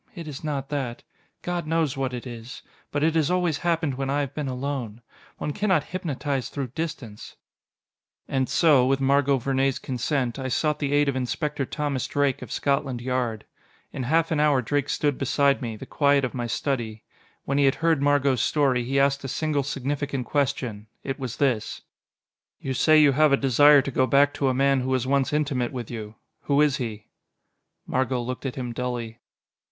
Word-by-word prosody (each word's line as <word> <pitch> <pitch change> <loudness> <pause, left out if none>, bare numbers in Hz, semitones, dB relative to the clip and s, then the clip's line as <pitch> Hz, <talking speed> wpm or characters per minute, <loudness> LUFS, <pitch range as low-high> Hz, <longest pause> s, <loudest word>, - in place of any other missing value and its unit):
It 170 -3 -7
is 145 -1 -7
not 140 -3 -3
that. 135 -5 -3 0.4
God 175 -2 -3
knows 160 -3 +1
what 135 -1 -2
it 125 0 -6
is. 120 +2 -9 0.3
But 145 0 -1
it 160 0 +3
has 160 -2 +2
always 180 -4 +1
happened 165 -4 0
when 135 +1 -3
I 145 +1 +1
have 140 -1 -4
been 150 -2 -3
alone. 125 -4 -4 0.3
One 150 - -3
cannot 205 0 +1
hypnotise 145 -7 -3
through 135 -3 -4
distance...." 125 -7 -6 0.9
And 130 -1 0
so, 150 -7 +5
with 135 0 +2
Margot 140 0 +3
Vernee's 135 +1 0
consent, 130 -1 -2
I 130 - -3
sought 150 +3 0
the 140 -2 -1
aid 145 0 +3
of 140 - 0
Inspector 140 +3 -2
Thomas 145 -4 -2
Drake, 140 -2 0
of - - -9
Scotland 140 -3 0
Yard. 120 -3 -2 0.5
In - - -5
half 160 +6 +1
an 155 - +1
hour 145 -4 +3
Drake 145 +4 -1
stood 145 -3 0
beside 140 +1 +2
me, 115 -3 -3
in - - -9
the - - -8
quiet 140 -2 +2
of 125 - -5
my 120 -2 -3
study. 115 -3 -2 0.4
When 140 +1 0
he 140 - +4
had 135 - +3
heard 165 -3 +1
Margot's 140 -3 +2
story, 135 -5 +2
he 135 +3 0
asked 140 0 +2
a - - -4
single 150 +2 -1
significant 140 -1 -3
question. 125 -7 -2 0.2
It 135 +1 -4
was 125 -3 -5
this: 130 -7 0 0.8
"You 135 - -3
say 155 +4 +4
you 150 -2 +6
have 150 +2 +4
a 140 - +5
desire 145 +2 +6
to 140 - -4
go 130 0 +2
back 140 +3 +4
to 140 - 0
a - - +1
man 135 0 +3
who 130 - -3
was 130 -2 +1
once 140 +1 +1
intimate 145 -5 0
with 125 -3 -6
you. 110 -2 -7 0.3
Who 140 0 +2
is 150 -3 +3
he?" 110 -5 -5 0.8
Margot 130 -1 0
looked 130 +3 -4
at 130 - -5
him 125 -3 -4
dully. 120 -2 -4
135 Hz, 195 wpm, -25 LUFS, 125-145 Hz, 0.9 s, you